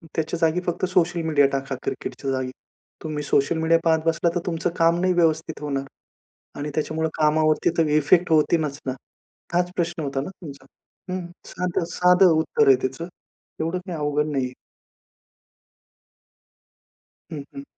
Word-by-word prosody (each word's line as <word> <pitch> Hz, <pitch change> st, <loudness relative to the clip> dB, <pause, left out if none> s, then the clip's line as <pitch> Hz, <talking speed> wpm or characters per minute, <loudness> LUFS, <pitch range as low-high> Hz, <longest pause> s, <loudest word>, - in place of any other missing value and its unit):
त्याच्या 160 Hz, +1 st, -1 dB
जागी 165 Hz, +2 st, +2 dB
फक्त 175 Hz, +1 st, -1 dB
सोशल 175 Hz, -2 st, +1 dB
मीडिया 145 Hz, -3 st, +4 dB
टाका 135 Hz, 0 st, -2 dB
क्रिकेटच्या 135 Hz, -1 st, -4 dB
जागी. 130 Hz, -1 st, -2 dB, 0.5 s
तुम्ही 150 Hz, -2 st, -3 dB
सोशल 145 Hz, +3 st, +1 dB
मीडिया 160 Hz, +1 st, +3 dB
पाहत 160 Hz, -1 st, +3 dB
बसला 165 Hz, +1 st, +2 dB
तर -, -, +2 dB
तुमचं 170 Hz, 0 st, -1 dB
काम 165 Hz, +1 st, +3 dB
नाही 185 Hz, 0 st, +2 dB
व्यवस्थित 160 Hz, -2 st, +1 dB
होणार 140 Hz, -2 st, -2 dB, 0.8 s
आणि 150 Hz, +1 st, -3 dB
त्याच्यामुळे 160 Hz, +1 st, -1 dB
कामावरती 155 Hz, 0 st, +3 dB
तर 165 Hz, -2 st, +3 dB
इफेक्ट 170 Hz, +3 st, +3 dB
होतीनच 155 Hz, -2 st, +2 dB
ना. 130 Hz, -, -1 dB, 0.6 s
हाच 180 Hz, +1 st, +1 dB
प्रश्न 170 Hz, -1 st, -2 dB
होता 135 Hz, -1 st, -2 dB
ना 145 Hz, -, -5 dB
तुमचा? 140 Hz, -5 st, -10 dB, 0.5 s
हं, 185 Hz, -1 st, -3 dB, 0.2 s
साधं, 175 Hz, -1 st, -2 dB
साधं 180 Hz, 0 st, +5 dB
उत्तर 160 Hz, -, +2 dB
आहे 135 Hz, -, +8 dB
त्याचं, 135 Hz, +6 st, -3 dB, 0.5 s
एवढं 165 Hz, +3 st, -1 dB
काही 175 Hz, -4 st, -5 dB
अवघड 150 Hz, 0 st, 0 dB
नाही 135 Hz, -3 st, 0 dB
आहे. 125 Hz, -, -6 dB, 2.8 s
हं, 145 Hz, -3 st, -5 dB
हं. 275 Hz, -, -7 dB
160 Hz, 150 wpm, -23 LUFS, 145-170 Hz, 2.8 s, आहे